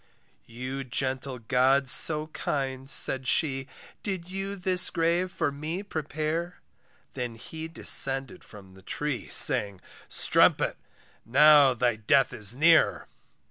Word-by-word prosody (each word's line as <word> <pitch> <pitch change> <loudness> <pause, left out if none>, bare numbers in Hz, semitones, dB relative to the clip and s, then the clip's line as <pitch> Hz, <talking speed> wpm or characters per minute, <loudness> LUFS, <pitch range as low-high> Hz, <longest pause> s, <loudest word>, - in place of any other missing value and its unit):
You 130 +4 -8
gentle 130 +1 -5
gods 130 +3 -1
so 155 -1 +5
kind, 135 -3 -7
said 130 -2 +2
she, 135 -2 -1 0.3
Did 185 -3 -8
you 195 +1 -6
this 185 -1 +2
grave 170 +2 -3
for 145 - -4
me 155 +7 -8
prepare? 160 0 -6 0.5
He 120 -2 -8 0.3
then - - -21
descended 135 +4 +5
from 95 -3 -17
the 95 - -19
tree, 145 +6 -6
Saying, 105 -9 +3 0.3
strumpet - - +1 0.5
now 140 +1 +3
thy 120 -1 -2
death 135 +6 -1
is 105 +2 -1
near. 150 - +1
135 Hz, 120 wpm, -24 LUFS, 125-165 Hz, 0.5 s, so